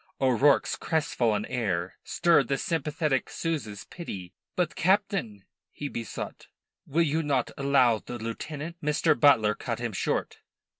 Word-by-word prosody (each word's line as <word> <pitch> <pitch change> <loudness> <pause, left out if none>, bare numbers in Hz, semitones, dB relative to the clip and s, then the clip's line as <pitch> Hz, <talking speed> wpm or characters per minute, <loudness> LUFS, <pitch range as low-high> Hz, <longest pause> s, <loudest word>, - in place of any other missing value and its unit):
O'Rourke's 135 +2 +3
crestfallen 120 -10 0
air 95 -6 -2
stirred 165 -7 +3
the 135 - 0
sympathetic 155 -3 -1
Souza's 140 -12 -3
pity. 95 - -8 0.2
"But, 175 -3 0
Captain," 185 - +1 0.3
he 145 - -5
besought, 115 -3 -6 0.4
"will 165 +4 +2
you 160 +1 +1
not 140 -5 0
allow 130 -5 +3
the 120 - -7
lieutenant 150 +8 -5
" - - -23
Mr. 150 +1 +3
Butler 115 -8 +5
cut - - -4
him - - -3
short. - - -2
140 Hz, 135 wpm, -28 LUFS, 115-160 Hz, 0.4 s, Butler